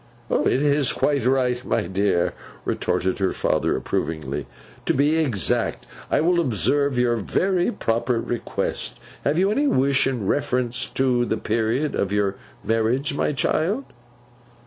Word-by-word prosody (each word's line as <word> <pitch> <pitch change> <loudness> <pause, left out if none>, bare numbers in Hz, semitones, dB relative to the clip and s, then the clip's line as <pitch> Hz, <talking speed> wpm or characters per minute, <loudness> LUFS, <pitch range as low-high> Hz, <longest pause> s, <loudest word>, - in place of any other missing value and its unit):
'It 135 - +2
is 145 -2 +3
quite 140 -3 +1
right, 125 -1 +1
my - - 0
dear,' 95 -1 +1 0.3
retorted 90 +2 -1
her 95 -1 +1
father - - 0
approvingly, 80 -5 -3 0.4
'to - - +2
be 145 +4 +3
exact. 130 -12 +1 0.2
I - - +2
will 175 +2 +3
observe 140 - +1
your 120 -1 +2
very 180 - +1
proper 115 - 0
request. 120 0 -3 0.2
Have 145 +3 +1
you 190 +3 +3
any 285 +7 +2
wish 140 - +2
in 125 -6 -2
reference 125 +1 0
to 125 -2 +1
the - - -1
period 115 +7 0
of 100 - -1
your 100 -1 +1 0.3
marriage, 115 +6 +1
my - - +1
child? 170 - 0
125 Hz, 140 wpm, -23 LUFS, 110-145 Hz, 0.4 s, is